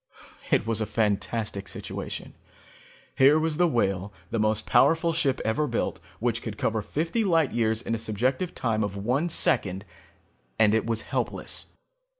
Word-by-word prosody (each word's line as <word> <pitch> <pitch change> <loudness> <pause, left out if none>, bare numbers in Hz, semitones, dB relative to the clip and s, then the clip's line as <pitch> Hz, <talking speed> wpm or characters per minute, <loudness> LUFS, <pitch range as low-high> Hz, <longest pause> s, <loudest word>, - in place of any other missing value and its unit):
"It - - +3
was 115 -1 0
a 110 - -1
fantastic 105 -1 -1
situation. - - -6 0.8
Here 140 +3 +6
was 155 -1 0
the 175 0 +4
Whale, 100 - 0 0.2
the 115 - 0
most 110 0 +1
powerful 165 +1 +4
ship 140 -5 +1
ever 130 +8 +1
built, 120 - -2 0.2
which 120 0 0
could 110 -2 -6
cover 110 +1 0
fifty 165 - -1
light 165 -7 +2
years 110 0 0
in 115 - -2
a 115 - -1
subjective 130 - -1
time 110 -3 0
of 100 -1 -3
one 130 - 0
second, 95 - +1 0.7
and 110 -1 +4
it 110 +1 +1
was 115 -1 0
helpless. - - -3
115 Hz, 155 wpm, -26 LUFS, 110-150 Hz, 0.8 s, Here